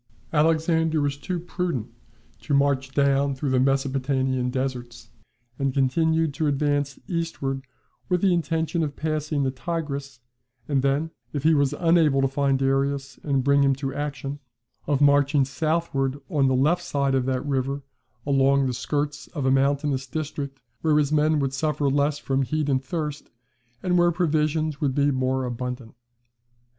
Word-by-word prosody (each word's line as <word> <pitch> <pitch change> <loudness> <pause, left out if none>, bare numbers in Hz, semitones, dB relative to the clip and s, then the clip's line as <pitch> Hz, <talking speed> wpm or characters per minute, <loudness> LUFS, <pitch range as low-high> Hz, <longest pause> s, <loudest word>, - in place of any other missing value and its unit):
Alexander 160 +1 +2
was 145 -1 0
too 175 +5 -4
prudent 175 - -3 0.5
to 130 +5 0
march 140 -1 +1
down 140 0 +2
through 135 +1 -2
the 130 - +3
Mesopotamian 130 -1 +1
deserts, 125 -2 -4 0.5
and 135 -1 0
continued 160 +3 +2
to 155 +2 -1
advance 145 -1 0
eastward 145 -7 -3 0.4
with 180 -1 +2
the 190 -2 +4
intention 165 0 0
of 145 -3 -2
passing 155 -2 -1
the 130 - 0
Tigris, 140 -1 -4 0.5
and 140 -3 +1
then, 140 +4 0 0.2
if 145 -2 -3
he 160 +1 +5
was 145 -1 +2
unable 165 -5 +3
to 135 - +3
find 135 0 +1
Darius 135 0 -1
and 135 -3 0
bring 140 +1 +4
him 135 -1 +3
to 135 0 -4
action, 145 -1 -4 0.5
of 145 -2 +1
marching 145 -1 +4
southward 140 -1 -1
on 140 -3 +3
the 130 - +2
left 155 +7 +2
side 140 -5 0
of 130 -1 +1
that 130 +1 -1
river 140 0 -1 0.4
along 140 -1 +3
the 130 - -1
skirts 145 +4 -3
of 145 -6 -4
a 130 - +3
mountainous 140 0 +1
district 140 -1 -5 0.2
where 155 -2 +3
his 150 -1 +2
men 155 0 +3
would 135 -2 -1
suffer 150 +1 0
less 145 +1 +1
from 135 -2 -1
heat 150 +2 -1
and 130 -1 +1
thirst, 150 +1 -4 0.5
and 180 -1 +2
where 175 0 +4
provisions 155 -3 0
would 135 -3 0
be 145 0 +3
more 130 0 0
abundant. 125 -1 -5
140 Hz, 160 wpm, -24 LUFS, 135-155 Hz, 0.5 s, he